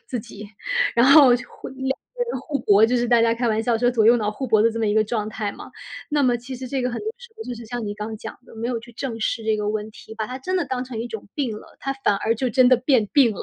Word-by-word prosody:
自 250 - -3
己， 210 -2 -10 0.5
然 240 +2 +5
后 275 -4 +8
就 - - -9
互 - - -10
两 265 - -13
个 485 - -3
人 - - -3
互 290 -3 -3
搏， 205 +1 +5
就 245 +2 +2
是 240 0 +1
大 235 -1 +4
家 230 0 +3
开 235 0 -1
玩 220 0 +1
笑 235 0 +1
说 245 +1 +2
左 230 -3 +2
右 235 - +7
脑 210 -3 -1
互 260 +5 -5
搏 215 -2 +4
的 230 - +4
这 230 - -5
么 220 - +1
一 205 - +1
个 220 - +4
状 215 -1 -2
态 210 -1 -4
嘛。 - - -11 0.4
那 295 -1 +1
么 245 -1 +3
其 250 +2 -8
实 260 - -7
这 260 0 -2
个 250 - 0
很 235 - -4
多 425 - -9
时 475 -1 -13
候 445 - -7
就 245 - -5
是 235 0 -10
像 240 0 -4
你 205 - -4
刚 215 +1 -5
讲 - - -8
的， - - -15
没 230 - -3
有 245 -2 -1
去 240 +1 -14
正 240 -1 -5
视 225 +1 -1
这 220 -1 +1
个 210 0 -2
问 215 0 -2
题， 220 0 -12
把 220 - -2
它 255 +3 -6
真 370 +8 -2
的 350 - +1
当 255 -2 -3
成 250 -3 -6
一 235 - -3
种 220 -4 -8
病 245 -7 -2
了， - - -14
他 275 - -3
反 270 -6 0
而 225 +3 0
就 255 +2 -1
真 255 +1 +5
的 255 - +6
变 245 -3 +2
病 260 -7 +5
了。 - - -6
240 Hz, 345 characters per minute, -23 LUFS, 220-260 Hz, 0.5 s, 后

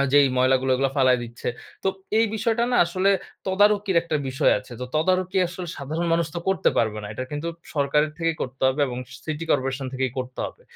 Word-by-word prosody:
আ - - +2
যেই 145 -1 +7
ময়লাগুলো 130 +1 +3
ওগুলা 135 +1 +1
ফালায় 130 -2 +4
দিচ্ছে। 120 +1 -6 0.3
তো - - +2 0.3
এই 225 - +5
বিষয়টা 230 +1 +1
না - - +4
আসলে 185 +3 +2 0.4
তদারকির 200 0 +3
একটা 170 -2 -1
বিষয় 130 - +3
আছে। - - -12
তো 125 - -2
তদারকি 185 +4 +1
আসলে 180 0 -7
সাধারণ 155 +5 -3
মানুষ 165 -1 +2
তো - - -1
করতে 190 - +3
পারবে 110 -2 +1
না। 105 - -5
এটা 130 - -4
কিন্তু 150 +3 -3 0.3
সরকারের 150 +1 +2
থেকেই 165 -1 0
করতে 130 +1 -7
হবে, 130 +3 -1
এবং 125 0 -4
স - - -11
সিটি 155 +1 -3
করপোরেশন 130 +1 0
থেকেই 130 -2 -1
করতে 130 0 -5
হবে। 485 - -12
150 Hz, 205 wpm, -24 LUFS, 130-180 Hz, 0.4 s, যেই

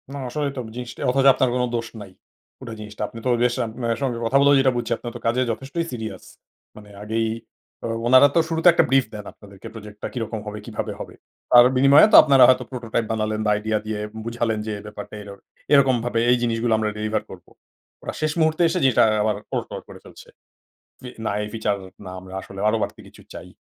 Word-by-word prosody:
না, - - -5
আসলেই 145 +2 -2
তো - - -2
জিনিসটা 125 -1 -8
অথচ 135 +2 +1
আপনার 130 - +1
কোনো 125 0 +1
দোষ 115 0 -3
নাই। 100 -2 -11 0.5
পুরা 120 -4 -8
জিনিসটা। 105 0 -9
আপনি 115 - -10
তো - - +1
রিয়েশান 120 -2 0
মানে 115 -1 0
সঙ্গে 130 -4 -1
কথা 135 +4 +2
বলেও 140 0 +5
যেটা 135 -1 +3
বুঝছি, 120 - -3
আপনি - - -10
তো - - -6
কাজে 120 +2 +1
যথেষ্টই 140 +8 -4
সিরিয়াস। 110 -3 -6 0.5
মানে 105 -1 -14
আগেই 110 +1 -1 0.6
ও - - -1 0.2
ওনারা 130 +3 +7
তো - - +5
শুরুতে 165 +1 +1
একটা - - +4
brief 135 -1 +3
দেন 105 -1 -8
আপনাদেরকে 100 -2 -13
প্রজেক্টটা 105 -2 -8
কীরকম 115 -2 -4
হবে, 105 0 -6
কীভাবে 110 -3 -5
হবে? - - -8 0.4
তার 120 0 +8
বিনিময়ে 140 +7 +7
তো - - +6
আপনারা 135 -3 +5
হয়তো 130 0 +4
prototype 115 -2 -3
বানালেন 110 -1 -2
বা - - +2
আইডিয়া 110 +1 -1
দিয়ে 110 -1 -4 0.3
বুঝালেন 115 -2 -2
যে, 110 - -2
"ব্যাপারটা 105 0 -9
এরও 100 -1 -10 0.4
এরকমভাবে 125 -4 +3
এই 125 - +4
জিনিসগুলো 115 0 0
আমরা 110 -1 -1
ডেলিভার 110 +1 -2
করবো।" - - -13 0.5
ওরা - - -5
শেষ 155 -1 +1
মুহূর্তে 160 +1 +1
এসে 180 - -1
জিনিসটা 130 -4 +4 0.2
আবার 105 -1 0 0.2
ওলটপালট - - -4
করে - - -11
ফেলছে, - - -15 0.7
"ফি 125 - -9 0.2
না - - 0
এই 105 - -5
ফিচার 110 -2 0 0.3
না, 90 - -8
আমরা 95 0 -12
আসলে 95 0 -10
আরো 110 - +2
বাড়তি - - -4
কিছু - - -17
চাই।" - - -9
115 Hz, 205 wpm, -22 LUFS, 110-130 Hz, 0.7 s, তার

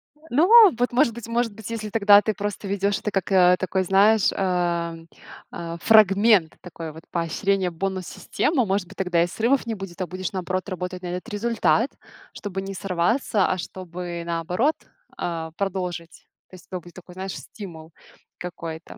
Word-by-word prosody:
Э, - - -29
ну, 305 +8 +3 0.3
вот, 245 - +1
может 240 -1 +3
быть, 235 -1 -8
может 230 -2 0
быть, 220 0 -9
если 215 -2 -4
тогда 205 -1 +6
ты 215 +1 -1
просто 205 0 -4
ведёшь 200 +1 0
это 210 - -3
как, 195 0 -2
э, 180 -1 +6
такой, 185 +1 0
знаешь, 200 +3 +4
ам, 170 -3 -1 0.4
а, 170 0 -6
фрагмент, 205 -4 +5
такой 165 -2 -8
вот, 160 +2 -12
поощрение, 180 +3 0
бонус-система, 195 - -1
может 190 -2 -1
быть, 195 - -15
тогда 175 -3 +2
и - - 0
срывов 235 +8 +1
не 225 - -2
будет, 195 -2 -8
а 180 - -2
будешь, 185 0 -5
наоборот, 185 +1 -3
работать 180 0 -5
на - - -4
этот 180 +6 -5
результат, 230 +3 +1 0.4
чтобы 195 -2 -5
не 195 0 -6
сорваться, 195 +3 +1
а 185 - 0
чтобы, 175 -1 -6
наоборот, 175 - 0 0.4
а, 165 -2 -4
продолжить. 180 -4 -4 0.2
То - - -13
есть 180 - -16
это 185 - -5
будет 175 0 -15
такой, 180 -1 -13
знаешь, 190 +1 -5
стимул 165 -6 -10 0.5
какой-то. 165 -2 -7
190 Hz, 170 wpm, -24 LUFS, 175-205 Hz, 0.5 s, тогда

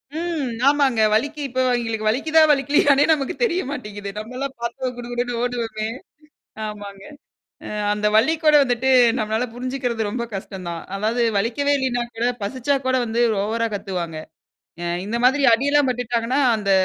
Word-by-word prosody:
ம். 320 -7 -2 0.2
ஆமாங்க. 275 -6 +3
வலிக்கு 290 +7 0
இப்ப 260 0 -4
அவங்களுக்கு 225 -3 -1
வலிக்குதான் 310 +6 +3
வலிக்கலையனே 285 +1 +3
நமக்கு 275 -3 -2
தெரிய 370 -5 +1
மாட்டேங்குது. 205 -7 -6
நம்மலாம் 255 +5 -5
பாத்தா 240 +2 -3
குடு 240 0 -7
குடுன்னு 245 -1 -2
ஓடுவோமே 225 -3 -2 0.8
ஆமாங்க, 200 -2 -9 0.6
அ - - -6 0.2
அந்த 210 0 0
வலிக்கூட 310 +5 +3
வந்துட்டு 250 +1 0 0.3
நம்மளால 220 +3 -1
புரிஞ்சுக்கிறது 245 -4 -2
ரொம்ப 235 +2 -3
கஷ்டம் 190 -2 -7
தான். 170 - -5 0.2
அதாவது 225 +4 0 0.2
வலிக்கவே 280 +7 +1
இல்லனா 245 -2 0
கூட, 235 - 0 0.2
பசிச்சா 260 +6 0
கூட 260 - +2
வந்து 230 +1 -1 0.2
ஓவரா 230 +2 -1
கத்துவாங்க. 180 -5 -4 0.7
அ - - -3 0.2
இந்த 230 +3 -2
மாதிரி 275 +2 +3
அடியெல்லாம் 285 +2 +2
பட்டுட்டாங்கன்னா, 245 +2 -1 0.2
அந்த 200 -2 -1
245 Hz, 140 wpm, -22 LUFS, 220-275 Hz, 0.8 s, ஆமாங்க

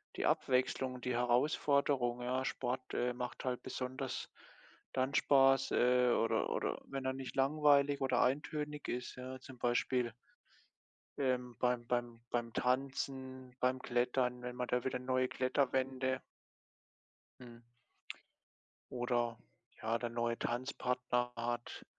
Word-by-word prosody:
die - - -1
Abwechslung, 130 0 +1
die 125 0 -1
Herausforderung, 125 0 +2
ja? 130 +2 -1
Sport, 130 0 -3
äh, 125 0 +1
macht 125 0 -5
halt 125 -1 -2
besonders 130 +1 -4 0.6
dann 130 +2 0
Spaß, 135 -1 +5
äh 125 0 +4
oder 115 - +1
oder - - -1
wenn 135 -1 -4
er 130 - +2
nicht 135 0 -6
langweilig 140 0 +4
oder 130 -2 +2
eintönig 150 +2 -1
ist, 125 0 -3
ja, 130 +1 -7
zum 130 -1 -11
Beispiel 120 0 +1 1.0
ähm, 125 -3 0
beim 125 -1 +1
beim 120 -1 -1
beim 120 -1 -1
Tanzen, 130 0 -2
beim 130 0 +2
Klettern, 125 0 0
wenn 125 0 -5
man 125 0 -1
da 125 0 0
wieder 130 -1 -1
neue 130 0 +1
Kletterwände 130 0 0 1.2
Mhm. 120 -1 -12 1.3
Oder, 120 -2 0 0.4
ja, 115 +1 +1
der 120 0 -3
neue 115 0 -1
Tanzpartner 125 -1 -1
hat 120 0 -4
125 Hz, 125 wpm, -35 LUFS, 120-130 Hz, 1.3 s, Spaß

